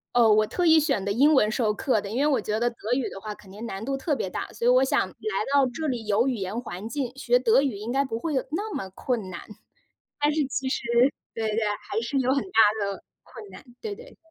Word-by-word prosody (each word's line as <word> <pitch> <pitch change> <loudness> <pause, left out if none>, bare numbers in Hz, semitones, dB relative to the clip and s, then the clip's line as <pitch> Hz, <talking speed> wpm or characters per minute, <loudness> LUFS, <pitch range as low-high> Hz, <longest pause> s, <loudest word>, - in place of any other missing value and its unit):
哦， 240 -2 +6
我 215 0 +4
特 355 - -1
意 320 -1 +7
选 275 -10 0
的 200 - 0
英 280 +9 +4
文 215 -7 +4
授 215 -1 +1
课 215 0 0
的， 200 - -7
因 230 +5 -2
为 290 - +3
我 285 -3 +2
觉 215 0 -2
得 240 +1 +2
德 235 - -15 0.2
语 250 -1 0
的 - - -9
话 215 -1 -5
肯 200 -2 -17
定 210 +4 -8
难 195 -2 -5
度 270 +3 -1
特 280 +3 -1
别 225 -9 -2
大， - - -4
所 - - -5
以 - - +6
我 255 +1 +5
想 265 - +1
来 - - -16 0.4
到 280 -1 +5
这 310 +6 -4
里 245 -5 -3
有 210 +4 +2
语 260 - 0
言 195 +2 -3
环 210 -3 -7
境， 265 -2 -3
学 245 -2 +2
德 250 +1 +4
语 270 -6 -1
应 215 +4 -5
该 275 +1 +3
不 225 -4 -4
会 315 +4 -3
有 265 - 0
那 410 +6 -3
么 190 - -4
困 215 +1 -3
难。 175 -2 -6 0.8
但 295 +1 +2
是 305 -1 +1
其 265 0 -2
实 - - -2 0.5
对 220 -1 -2
对， 215 +1 -1 0.3
还 - - -1
是 235 +4 -1
有 260 0 +2
很 275 - +1
大 225 - +4 0.2
的 200 -1 -5 0.2
困 435 -4 -12
难， - - -12 0.2
对 435 -2 -4
对。 480 +3 -14
245 Hz, 285 characters per minute, -26 LUFS, 215-280 Hz, 0.8 s, 意